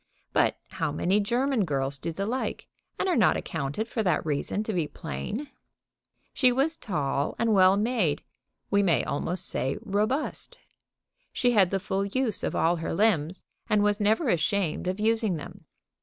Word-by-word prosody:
But - - +2
how - - -2
many 190 +4 +1
German 240 +3 +1
girls 140 -4 -2
do 165 - -3
the 195 +5 -3
like, 250 +5 -3 0.3
and - - -1
are 360 - +2
not 225 - +4
accounted 145 +11 -3
for 230 - -2
that 180 -7 +1
reason 155 +7 -1
to 220 - -3
be 170 -5 0
plain? 205 - -5 0.8
She 255 -3 +4
was 275 +6 +2
tall 145 - -2
and 230 -1 +2
well 190 0 +6
made, 210 -9 0 0.5
we 200 - +4
may 165 -10 +2
almost 175 +5 -2
say 135 +1 -1
robust. 215 +9 -2 0.7
She 245 - +2
had 200 -6 +4
the 195 - 0
full 190 +1 -1
use 225 +2 -1
of - - -1
all 170 +2 +2
her 165 - -3
limbs, 185 -4 +1 0.3
and 210 -1 +3
was 205 0 +2
never 220 +8 +2
ashamed 175 0 0
of 185 +2 -2
using 220 -3 +1
them. 175 +3 -9
200 Hz, 170 wpm, -27 LUFS, 165-225 Hz, 0.8 s, well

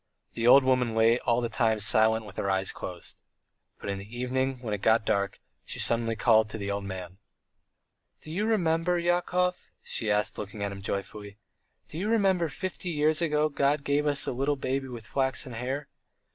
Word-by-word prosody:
The 115 0 -1
old 135 +2 +8
woman 125 -3 +1
lay 115 +2 +4
all 120 0 +1
the 120 - 0
time 110 -1 +1
silent 110 +1 +3
with 100 -3 -12
her 100 - -1
eyes 95 0 0
closed. 90 -2 -8 0.6
But 100 - -4
in 100 - -4
the 105 +5 -10
evening, 130 +1 -1
when 110 -4 -3
it 100 - -3
got 110 0 +3
dark, 100 -2 0 0.2
she - - -5
suddenly 115 -1 0
called 110 -1 +4
the 100 -2 -4
old 100 0 -3
man. 95 -1 -7 1.0
"Do 155 - -10
you 205 +6 -1
remember, 175 -4 +1
Yakov," 180 +1 0
she 110 - -2
asked, 105 0 +1
looking 105 0 -6
at 100 - -2
him 100 0 -8
joyfully. 100 +1 -5 0.5
"Do 155 - -7
you 205 +4 -1
remember 190 -7 +2
fifty 185 +1 -5
years 155 0 +2
ago 150 -2 +2
God 140 0 +1
gave 145 +1 +1
us 145 -1 +1
a - - -1
little 135 +3 0
baby 135 0 -2
with 120 -3 -8
flaxen 130 0 -1
hair? 130 +5 -4
125 Hz, 185 wpm, -28 LUFS, 105-150 Hz, 1.0 s, old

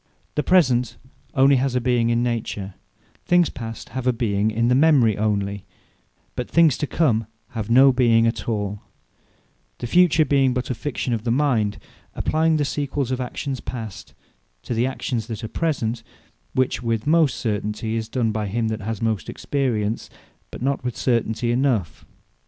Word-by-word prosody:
The 150 - 0
Present 130 -10 +2 0.4
onely 135 +1 +5
has 130 0 0
a - - +3
being 120 -1 +1
in 120 0 +1
Nature; 110 -5 -3 0.5
things 175 -2 +3
Past 115 -2 -7
have 130 +1 -4
a - - +5
being 110 -3 0
in 115 +2 0
the 125 - +3
Memory 135 -6 +4
onely, 100 -1 -1 0.7
but 125 - -4
things 165 -5 +4
To 150 - -1
Come 115 -10 +1 0.2
have 110 -2 -5
no 130 +3 +6
being 115 -2 +4
at 115 0 -1
all; 105 -2 -2 1.0
the - - -5
Future 160 +3 +4
being 135 -2 +2
but 125 0 -2
a - - +1
fiction 125 0 -3
of 110 -2 -2
the 120 - -2
mind, 120 -5 +1 0.4
applying 160 0 +1
the 145 - +1
sequels 140 -2 -2
of 130 0 -1
actions 130 +1 -4
Past, 110 -5 -7 0.5
to - - -3
the 120 +2 +1
actions 120 -4 -3
that 115 -3 -6
are - - -3
Present; 120 -4 -2 0.5
which 130 -2 +1
with 115 -2 -1
most 155 -3 +3
certainty 105 0 -2
is 110 0 -3
done 115 -2 0
by 105 -1 -2
him 110 +3 -1
that 110 0 -3
has 110 +1 -4
most 110 -6 -1
Experience; 115 -6 -2 0.4
but - - -8
not 135 0 0
with 125 -2 -3
certainty 120 -1 0
enough. 120 - 0
120 Hz, 170 wpm, -22 LUFS, 110-135 Hz, 1.0 s, no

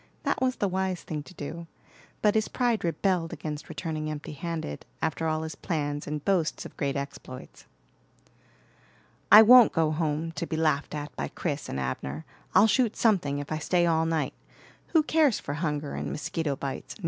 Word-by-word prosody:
That - - 0
was 255 0 +2
the 200 - 0
wise 190 -1 -2
thing 150 -2 -4
to 185 - -13
do, 165 +3 -6 0.6
but 210 -1 +5
his 220 0 +1
pride 240 -3 0
rebelled 175 0 0
against 155 -1 -6
returning 155 -3 -4
empty 150 -1 -6
handed 155 - -5 0.2
after 160 +1 -1
all 155 0 0
his 160 0 -5
plans 145 -3 -3
and 150 0 -4
boasts 180 -5 +1
of - - -10
great 140 -2 -1
exploits. 140 -2 -7 1.6
"I 215 - +11
won't 245 +1 +8
go 160 -2 +2
home, 155 0 -1
to 170 0 -4
be 160 - -3
laughed 155 -2 +1
at 150 0 -6
by - - -3
Chris 150 -4 -4
and 65 - -3
Abner. 65 +3 -4 0.3
I'll - - +8
shoot 230 0 +2
something, 180 -11 +2
if 145 +1 -6
I 155 - -1
stay 175 +3 +2
all 160 -1 +2
night. 160 -4 0 0.5
Who 320 -3 +3
cares 305 -6 +3
for 145 - -5
hunger 150 -2 -2
and - - -3
mosquito 150 -1 -2
bites? 135 0 -5
160 Hz, 180 wpm, -27 LUFS, 145-185 Hz, 1.6 s, I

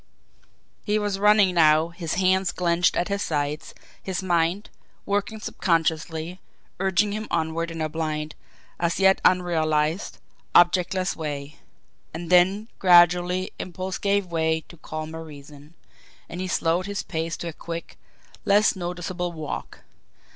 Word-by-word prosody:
He 210 0 +1
was 205 -2 -1
running 205 -2 +5
now, 160 -1 +4
his 170 -1 -4
hands 185 0 +2
clenched 175 -1 +1
at 175 - 0
his 200 0 -1
sides; 150 -2 -3 0.3
his 190 0 -4
mind, 175 +2 0 0.3
working 205 +2 -1
subconsciously, 165 -1 -1 0.4
urging 195 +2 +2
him 215 +1 -4
onward 165 0 -1
in 165 -1 -6
a 155 - 0
blind, 155 -1 -3 0.5
as 170 +1 0
yet 190 0 +4
unrealised, 160 -2 +1 0.4
objectless 180 +1 +3
way. 145 -2 -5 0.6
And 170 +1 -6
then 190 +4 +4
gradually 180 0 +4
impulse 185 +1 -5
gave 200 -1 +1
way 160 -2 0
to 170 - -13
calmer 155 +1 -6
reason, 145 0 -13 0.5
and 175 - -6
he 185 - -3
slowed 175 +1 0
his 200 -1 -3
pace 165 0 -3
to 170 - -5
a - - -8
quick, 170 +1 -7 0.5
less 205 +2 +4
noticeable 175 0 -4
walk. 155 -3 -7
175 Hz, 135 wpm, -24 LUFS, 160-190 Hz, 0.6 s, running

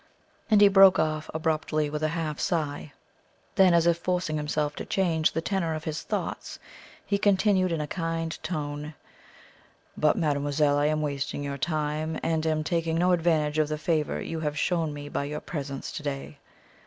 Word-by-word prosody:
and 210 -2 +5
he 205 - +9
broke 195 -1 +7
off 155 0 -1
abruptly 155 -1 0
with 150 +1 -4
a 155 - +2
half 155 -2 -3
sigh. 150 -3 -2 0.6
Then, 190 -2 +5
as 170 -1 +4
if 170 -1 +3
forcing 180 -3 -1
himself 150 0 -1
to - - -4
change 165 -5 +1
the 165 - -1
tenor 170 -5 -1
of 155 - -6
his 155 0 -3
thoughts, - - -4 0.5
he 200 - 0
continued 195 -2 +3
in 165 - -1
a 150 - -1
kind 165 0 -3
tone: 150 -2 -4 1.0
"But, 150 0 +3
mademoiselle, 145 -2 +1
I 145 - +2
am 155 0 0
wasting 145 0 -3
your 140 -1 -4
time, 155 0 -1
and 160 -1 0
am 155 -1 +1
taking 165 0 0
no 180 +2 +3
advantage 160 -3 +2
of 155 - +3
the 155 0 -3
favour 155 -1 0
you 165 - -4
have 150 -1 -2
shown 165 -2 0
me 145 0 -7
by 140 - -2
your 150 +1 -4
presence 140 -4 -5
to 165 - -6
day. 140 0 -5
155 Hz, 180 wpm, -27 LUFS, 150-165 Hz, 1.0 s, he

